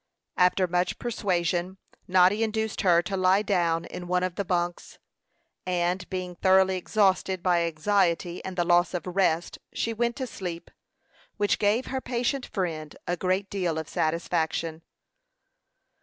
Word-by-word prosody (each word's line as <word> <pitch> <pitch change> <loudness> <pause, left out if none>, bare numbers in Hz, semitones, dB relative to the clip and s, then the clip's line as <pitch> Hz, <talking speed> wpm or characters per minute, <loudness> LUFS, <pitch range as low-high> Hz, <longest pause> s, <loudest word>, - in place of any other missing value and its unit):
After 180 +1 +4
much 180 0 0
persuasion, 185 -5 -1 0.3
Noddy 185 +3 +4
induced 220 -1 -1
her 175 -2 +4
to 200 - -3
lie 190 +2 +3
down 170 -5 +1
in 175 - -8
one 180 0 +1
of 185 -1 -1
the 200 - -2
bunks, 175 -1 -2 0.7
and 180 0 -1
being 185 -1 -4
thoroughly 190 +1 +4
exhausted 190 -1 +1
by 175 -2 +3
anxiety 170 +1 0
and 190 -1 -6
the 175 - +3
loss 175 +1 +3
of 175 - -3
rest, 180 -2 0
she 230 - -1
went 235 +1 0
to 260 - -3
sleep, 180 -7 -7 0.7
which 205 -1 +1
gave 215 +5 +2
her 265 -1 -3
patient 250 +2 -2
friend 160 -6 -4
a 175 - -1
great 185 +3 0
deal 180 -5 -2
of 160 -1 -4
satisfaction. 160 0 -1
185 Hz, 145 wpm, -26 LUFS, 175-200 Hz, 0.7 s, After